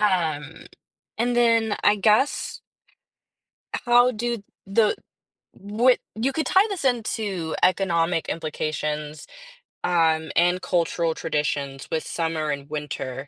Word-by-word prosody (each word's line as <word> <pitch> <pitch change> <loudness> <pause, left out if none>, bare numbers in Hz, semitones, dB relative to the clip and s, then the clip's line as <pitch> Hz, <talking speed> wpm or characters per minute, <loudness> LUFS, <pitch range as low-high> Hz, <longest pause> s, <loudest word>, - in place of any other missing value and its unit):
um, 160 -6 -1 0.5
and 240 +1 +1
then 230 -3 +3
I 205 0 +5
guess 215 +7 +1 1.3
how 245 +1 +5
do 235 -1 -3 0.2
the 210 +2 +3 0.6
what 225 +6 +2 0.2
you 235 +5 0
could 315 +2 -1
tie 385 +3 +4
this 370 -9 -4
into 215 -8 -1
economic 175 -3 +2
implications, 150 -1 -3 0.6
um, 160 -3 +2
and 175 +2 +3
cultural 170 -1 0
traditions 145 -3 -2
with 160 - -1
summer 160 -2 -2
and 140 0 -5
winter. 145 -3 -5
175 Hz, 110 wpm, -24 LUFS, 155-225 Hz, 1.3 s, I